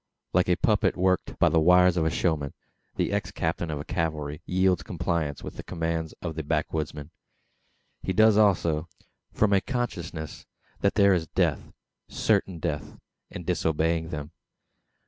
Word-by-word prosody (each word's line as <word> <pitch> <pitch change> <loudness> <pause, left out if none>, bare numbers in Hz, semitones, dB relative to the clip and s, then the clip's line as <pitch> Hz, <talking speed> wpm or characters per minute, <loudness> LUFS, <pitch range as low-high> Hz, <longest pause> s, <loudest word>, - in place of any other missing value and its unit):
Like 90 0 +3
a 90 - +4
puppet 105 +3 +2
worked 95 0 +1
by - - +4
the 80 - +3
wires 90 +2 +5
of 85 - +1
the - - +3
showman, 80 -5 -1 0.4
the - - 0
ex - - -1
captain 80 +1 -2
of 75 -1 -4
cavalry 75 -3 -2
yields 95 -1 +2
compliance 85 -4 -2
with - - -8
the - - -6
commands 80 -2 -3
of 85 -2 -3
the 80 - -4
backwoodsman. 75 0 -2 0.9
He - - -2
does 110 +4 +5 0.2
so, 80 0 -2 0.4
from 105 -1 +2
a 95 - +4
consciousness 90 - -4 0.3
that - - +1
there 100 -1 +5
is 85 -3 0
death - - 0 0.4
certain 100 -4 0
death 75 -1 -4 0.3
in 90 - -7
disobeying 80 -1 0
them. 75 -2 -5
85 Hz, 150 wpm, -27 LUFS, 80-90 Hz, 0.9 s, wires